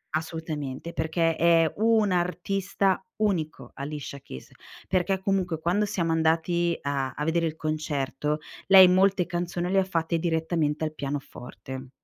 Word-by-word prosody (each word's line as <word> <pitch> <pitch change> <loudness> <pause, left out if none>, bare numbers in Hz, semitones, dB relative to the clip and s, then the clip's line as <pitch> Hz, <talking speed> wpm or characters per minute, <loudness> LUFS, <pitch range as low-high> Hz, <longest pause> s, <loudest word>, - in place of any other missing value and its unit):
assolutamente 160 -2 -4
perché 165 0 0
è 165 -1 +4
un 220 -2 +3
artista 190 +2 0
unico 180 -8 -1
Alicia 140 0 -6
Keys, 65 - -11 0.4
perché 190 +1 +1
comunque, 190 -4 -1
quando 180 +6 +1
siamo 175 -5 -1
andati 165 +1 +1
a 140 -2 -2
a 150 - -3
vedere 165 +1 +1
il 155 - -5
concerto 150 -1 -2 0.3
lei 190 -1 +9
molte 185 0 +3
canzoni 175 +1 -3
le 195 - +4
ha - - +3
fatte 170 -2 -1
direttamente 160 -2 0
al 155 - -4
pianoforte. 135 -2 -7
165 Hz, 135 wpm, -26 LUFS, 155-185 Hz, 0.4 s, lei